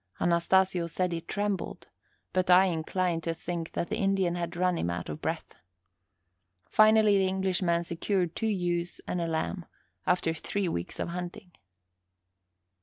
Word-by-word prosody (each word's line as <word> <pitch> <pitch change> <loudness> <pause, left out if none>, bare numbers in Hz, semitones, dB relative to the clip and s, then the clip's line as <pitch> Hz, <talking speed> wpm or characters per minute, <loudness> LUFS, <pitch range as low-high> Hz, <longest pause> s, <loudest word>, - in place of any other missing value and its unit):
Anastasio 175 +1 +2
said 180 +2 -1
he 165 -1 -2
trembled, 205 +2 -3 0.5
but 185 0 +1
I 180 +1 +8
incline 175 0 0
to 165 0 -2
think 165 0 -5
that 170 - -2
the 215 - -1
Indian 195 -3 +2
had 170 -1 -3
run 180 0 +2
him 85 - -1
out 85 -1 -4
of 75 - -6
breath. - - -3 1.1
Finally 215 - +5
the 190 - +3
Englishman 185 -2 +1
secured 175 +1 -1
two 225 - -1
ewes 175 -4 -1
and 180 - -1
a 170 - -1
lamb, 165 +2 -2 0.4
after 175 -2 +2
three 195 +4 -2
weeks 85 - -3
of - - -2
hunting. 180 +3 -6
180 Hz, 150 wpm, -29 LUFS, 170-190 Hz, 1.1 s, I